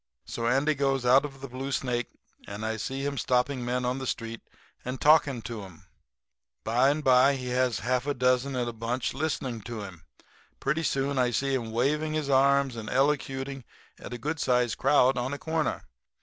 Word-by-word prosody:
"So 115 0 -3
Andy 135 +5 +2
goes 135 -2 0
out 130 +4 +5
of 135 -2 -9
the 135 - -6
Blue 130 +2 -5
Snake, 125 -3 -1 0.4
and 100 +2 -5
I 110 0 -2
see 135 +5 -4
him 140 -1 -2
stopping 125 +1 +1
men 125 +1 -1
on 125 +2 -1
the 130 - -4
street 115 -1 -4 0.4
and 125 +1 -4
talking 145 -6 +4
to 115 0 -6
'em. 90 -4 -14 0.8
By 125 +4 +3
and 150 +2 -1
by 130 +1 +5
he 125 -1 -5
has 125 -2 +1
half 125 +2 0
a 145 - 0
dozen 125 +1 +1
in 125 -1 -1
a 120 - -4
bunch 115 +2 -2
listening 135 -5 -2
to 115 0 -6
him; 90 -4 -11 0.4
and - - -42
pretty 150 +4 0
soon 135 -3 0
I 125 -1 +3
see 135 +3 0
him 120 -4 -1
waving 150 +7 0
his 150 -3 -1
arms 140 -1 +3
and 110 -2 -6
elocuting 135 -1 0 0.4
at - - -9
a 125 - -4
good 150 +6 -3
sized 125 -3 +1
crowd 135 -2 +4
on 130 +3 -2
a - - -3
corner. 160 +1 -2
130 Hz, 200 wpm, -28 LUFS, 120-140 Hz, 0.8 s, out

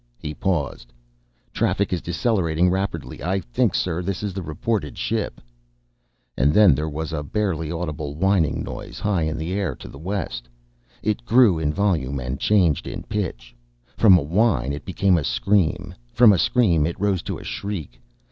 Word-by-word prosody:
He 75 +3 -6
paused. 75 -8 -2 0.6
"Traffic 100 -2 0
is 90 - -1
decelerating 90 -2 +1
rapidly. 95 -4 -3
I 95 +2 0
think, 65 -10 0
sir, 90 -1 -1
this 95 +2 -3
is 100 -2 -2
the 95 - -4
reported 85 - -3
ship." - - -2 1.0
And 70 +4 +2
then 105 -7 +7
there 75 +3 -2
was 80 +1 -4
a 75 - -2
barely 80 -1 -2
audible 75 -4 -4
whining 90 -2 +1
noise - - -7
high 100 -5 0
in 80 0 -1
the 80 +3 -3
air 95 -9 -1
to - - -11
the 70 - -11
west. 85 -9 -4 0.5
It 110 +3 -1
grew 115 -8 +5
in 75 -2 0
volume 75 -7 0
and 65 +2 -4
changed 85 -7 +2
in - - -6
pitch. - - -4 0.4
From 100 -5 +7
a 80 - -1
whine 80 - +1
it 70 0 -7
became 95 -1 +2
a - - -3
scream. 100 +1 +1 0.2
From 115 -3 +7
a 95 - +1
scream 85 -12 +3
it 85 - -5
rose 100 -3 +1
to - - -5
a - - -10
shriek. 95 -11 -5
85 Hz, 175 wpm, -23 LUFS, 75-100 Hz, 1.0 s, then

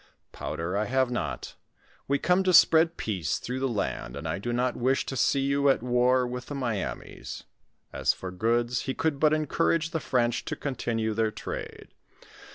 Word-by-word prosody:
"Powder, 85 +3 -4
I 105 +1 +1
have 130 +1 +1
not; 120 - -3 0.5
we 140 - +2
come 180 +5 +2
to 185 - +3
spread 165 +1 +6
peace 95 -8 -1
through 125 +2 -4
the 135 - 0
land, 70 - -3
and 70 +3 -5
I 80 +5 -2
do 120 +4 -3
not 125 +1 0
wish 130 +2 +1
to 135 - -4
see 135 +3 +2
you 140 +1 +2
at 135 - +2
war 125 +1 +3
with 125 0 -5
the 145 - -5
Miamis." 120 -7 -4 0.5
As - - +2
for 95 - -7
goods, 120 +5 0
he 130 - -1
could 155 -3 0
but 155 0 +4
encourage 155 +1 +1
the 160 - -1
French 120 -4 0
to - - -3
continue 115 -5 -2
their 110 0 +1
trade. - - -7
125 Hz, 180 wpm, -27 LUFS, 115-140 Hz, 0.5 s, spread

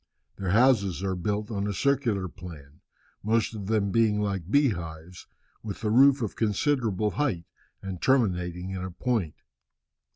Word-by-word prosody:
Their 95 -2 -3
houses 100 -4 +3
are 95 -1 0
built 105 +4 -2
on 100 -1 -2
a 100 - -2
circular 120 -6 0
plan, 75 -6 -12 0.4
most 115 +2 +1
of 100 -3 -6
them 105 -2 +1
being 110 -2 +2
like 100 -4 -2
bee 140 +3 +4
hives, 85 -2 -7 0.3
with 105 -3 -7
the 105 -2 0
roof 135 +2 +5
of 110 - -4
considerable 110 -2 0
height, 105 - -1 0.4
and 95 -3 -6
terminating 90 -8 +1
in 95 -1 -4
a 95 - -4
point. 100 - -2
100 Hz, 155 wpm, -27 LUFS, 90-115 Hz, 0.4 s, roof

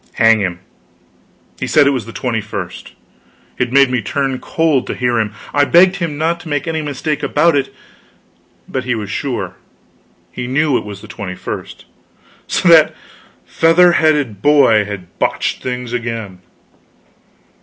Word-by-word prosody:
Hang 115 -1 +4
him, 90 -3 -3 1.0
he - - -3
said 150 - +4
it 140 - +4
was 125 -5 -3
the - - -7
twenty 115 -2 -2
first! 100 -4 -7 0.7
It 125 -1 0
made 135 -1 +4
me 125 -2 0
turn 135 +4 -2
cold 160 -5 0
to - - -3
hear 120 -2 0
him. 105 -2 -1 0.2
I 145 - +4
begged 180 +5 +5
him 165 -5 -3
not 165 +2 0
to 170 - -10
make 145 0 -2
any 160 -1 -1
mistake 150 +1 -3
about 165 +1 +2
it; 135 -1 -1 1.0
but 130 - -3
he 125 -1 -1
was 105 -2 -5
sure; 105 - -4 0.7
he 125 -1 -5
knew 140 +2 +1
it - - -1
was 100 -1 -8
the - - -10
21st. 90 -4 -7 0.6
So, - - 0
that 165 -2 +6 0.5
feather 170 +2 +4
headed 150 - +1
boy 130 -7 +4
had 95 -4 -9
botched - - -1
things 125 -1 -4
again! 115 -6 -4
130 Hz, 155 wpm, -16 LUFS, 110-150 Hz, 1.0 s, that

